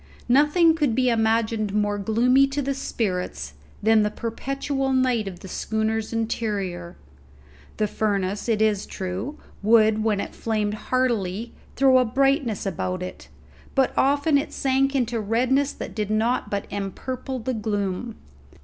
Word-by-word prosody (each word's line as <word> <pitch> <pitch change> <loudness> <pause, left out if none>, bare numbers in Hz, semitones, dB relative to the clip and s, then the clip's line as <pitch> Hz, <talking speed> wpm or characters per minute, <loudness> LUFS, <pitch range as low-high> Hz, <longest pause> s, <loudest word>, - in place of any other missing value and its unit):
Nothing 295 +6 +5
could 290 -8 +1
be 255 0 +3
imagined 220 -2 +1
more 205 -1 +1
gloomy 245 +6 +3
to 280 +1 -2
the 275 +1 -1
spirits 205 -8 -3 0.3
than 220 0 +5
the 210 - +2
perpetual 270 +5 -3
night 250 -5 +2
of 180 -2 -7
the - - -9
schooner's 220 +2 -2
interior. 205 -6 -3 0.8
The 215 - +2
furnace, 200 0 -1
it 220 -1 +2
is 210 -2 +1
true, 195 +10 -5 0.2
would, 220 0 +4
when 215 -2 +1
it - - -4
flamed 215 -2 -1 0.2
heartily, 230 -4 0 0.2
throw 265 -1 +5
a 255 - +3
brightness 270 -2 +1
about 185 -1 -2
it; 185 - -8 0.5
but 270 -1 +2
often 285 +2 +3
it 285 - -5
sank 270 0 +1
into 240 -3 0
redness 255 +6 +1
that - - -7
did 210 -2 -2
but 215 -2 0
empurple 255 +7 -4
the 260 - 0
gloom. 210 0 -2
225 Hz, 140 wpm, -24 LUFS, 205-260 Hz, 0.8 s, Nothing